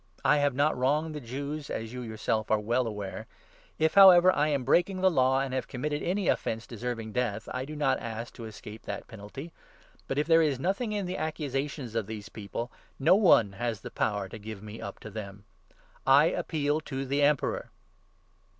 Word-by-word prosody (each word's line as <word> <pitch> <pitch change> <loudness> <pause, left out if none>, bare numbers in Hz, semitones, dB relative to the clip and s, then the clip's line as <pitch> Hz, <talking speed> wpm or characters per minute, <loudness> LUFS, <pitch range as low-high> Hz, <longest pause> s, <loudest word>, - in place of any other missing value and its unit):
I 145 +3 +5
have 145 -2 +1
not 145 +3 +2
wronged 150 +5 +1
the 150 - -6
Jews, 140 +4 -5
as 115 +1 -4
you 125 - -5
yourself 110 -1 -2
are 110 - +4
well 120 +3 0
aware. 105 -3 -5 0.5
If, 160 0 +2
however, 185 -2 +9
I 150 +1 +2
am 140 -4 0
breaking 175 +9 +3
n - - -4
the 190 - +6
law 130 -3 +3
and 135 -1 -3
have 130 - -2
committed 145 +3 -3
any 190 +1 -1
offence 115 0 0
deserving 115 -1 -5
death, 110 -3 -2
I 130 0 -3
do 155 +2 -7
not 135 -3 +1
ask 115 +1 -6
to 115 - -8
escape 110 0 -9
the - - -5
penalty; 115 +10 -9 0.5
but, 135 - -2
if 150 - +2
there 165 0 +5
is 145 -5 +1
nothing 200 - -1
in 205 -2 -1
the 180 +1 -3
accusations 140 -4 -3
of 115 -3 -1
these 110 -2 -7
people, 110 +3 -6 0.3
no 135 - +5
one 175 - +5
has 110 +1 -3
the - - -8
power 105 -2 -1
to 110 - -8
give 105 -1 -8
me 105 +1 -8
up 100 - -6
to 110 - -9
them. 100 -1 -8 0.6
I 140 +4 +6
appeal 150 -1 -1
to 135 -3 -4
the 140 +2 0
Emperor." 145 -1 +1
130 Hz, 200 wpm, -29 LUFS, 110-150 Hz, 0.6 s, however